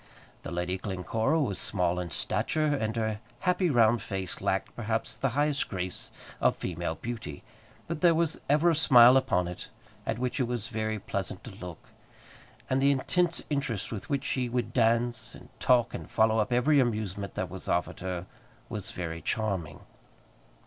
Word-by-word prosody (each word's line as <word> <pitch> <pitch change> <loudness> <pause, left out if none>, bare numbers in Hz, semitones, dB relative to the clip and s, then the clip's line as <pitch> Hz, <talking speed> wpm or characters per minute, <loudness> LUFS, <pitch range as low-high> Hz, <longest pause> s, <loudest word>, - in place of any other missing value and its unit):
The - - -6
Lady 90 +2 -2
Glencora 110 - 0
was 100 - -1
small 90 -5 +1
in 90 -1 -4
stature, 155 - 0
and 120 -7 0
her 110 -2 -1 0.2
happy 180 -1 +2
round 115 -3 +4
face 95 -3 -4
lacked, 95 - -1
perhaps, 115 -1 -2
the 135 - 0
highest 145 -1 +1
grace 90 -2 -4 0.3
of - - +3
female 85 -2 -3
beauty. 110 -11 -6 0.4
But 160 -2 -4
there 170 -2 +6
was 165 -1 +1
ever 155 +4 +5
a - - +2
smile 125 -5 +8
upon 90 -9 +2
it, 90 - -7 0.4
at - - 0
which 125 +3 -2
it 130 - +2
was 120 -1 -3
very 110 -1 -2
pleasant 100 - -4
to - - -8
look; 90 -3 -10 0.8
and 130 +1 +1
the 140 - +5
intense 170 +5 +1
interest 140 -8 -1
with 110 -4 -6
which 140 -1 0
she 125 -2 -1
would 120 -1 -2
dance, 115 0 +1
and - - -14
talk, 125 -3 +3
and - - -6
follow 110 0 +3
up 105 - 0
every 130 +5 +4
amusement 105 -6 -1
that - - -3
was - - -6
offered 90 0 0
her, 90 -1 -4 0.4
was - - -5
very 85 -2 -5
charming. 95 -9 -2
115 Hz, 170 wpm, -29 LUFS, 95-135 Hz, 0.8 s, smile